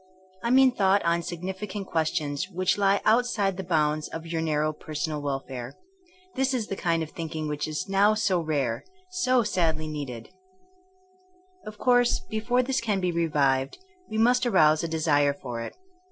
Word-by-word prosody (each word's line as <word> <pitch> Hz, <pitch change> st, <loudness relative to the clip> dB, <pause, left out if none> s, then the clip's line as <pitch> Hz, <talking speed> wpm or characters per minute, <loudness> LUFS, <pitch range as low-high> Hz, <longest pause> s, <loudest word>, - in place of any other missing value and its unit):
I 235 Hz, -, -1 dB
mean 260 Hz, +1 st, +6 dB
thought 200 Hz, -4 st, +2 dB
on 170 Hz, 0 st, +2 dB
significant 190 Hz, +4 st, -5 dB
questions 155 Hz, -1 st, -1 dB
which 185 Hz, 0 st, 0 dB
Ue 200 Hz, 0 st, +3 dB
outside 215 Hz, -4 st, +2 dB
the 190 Hz, -, -5 dB
bounds 155 Hz, -3 st, 0 dB
of 165 Hz, 0 st, -7 dB
your 165 Hz, -1 st, -2 dB
narrow 155 Hz, -1 st, 0 dB
personal 150 Hz, 0 st, -4 dB
welfare. 135 Hz, -2 st, -5 dB, 0.6 s
This 265 Hz, 0 st, 0 dB
is 235 Hz, -4 st, -1 dB
the 195 Hz, -, -2 dB
kind 165 Hz, -3 st, 0 dB
of 160 Hz, -, -8 dB
thinking 160 Hz, -2 st, -5 dB
which 150 Hz, 0 st, -3 dB
is 155 Hz, +5 st, -4 dB
now 200 Hz, +2 st, +3 dB
so 195 Hz, -4 st, +1 dB
rare 140 Hz, -8 st, -1 dB, 0.2 s
— 365 Hz, 0 st, -36 dB
so 255 Hz, -1 st, +4 dB
sadly 165 Hz, -6 st, 0 dB
needed 140 Hz, -7 st, -6 dB, 1.4 s
1 -, -, -12 dB
Of 215 Hz, 0 st, -8 dB
course 245 Hz, +1 st, +3 dB
before 240 Hz, +3 st, 0 dB
this 260 Hz, +1 st, -1 dB
can 210 Hz, -4 st, 0 dB
be 180 Hz, -1 st, 0 dB
revived 145 Hz, -5 st, +1 dB, 0.3 s
we 220 Hz, -, -3 dB
must 245 Hz, +3 st, +3 dB
arouse 155 Hz, -8 st, +4 dB
a -, -, -1 dB
desire 150 Hz, -3 st, +2 dB
for 120 Hz, -4 st, -6 dB
it. 115 Hz, -, -7 dB
170 Hz, 170 wpm, -26 LUFS, 150-210 Hz, 1.4 s, mean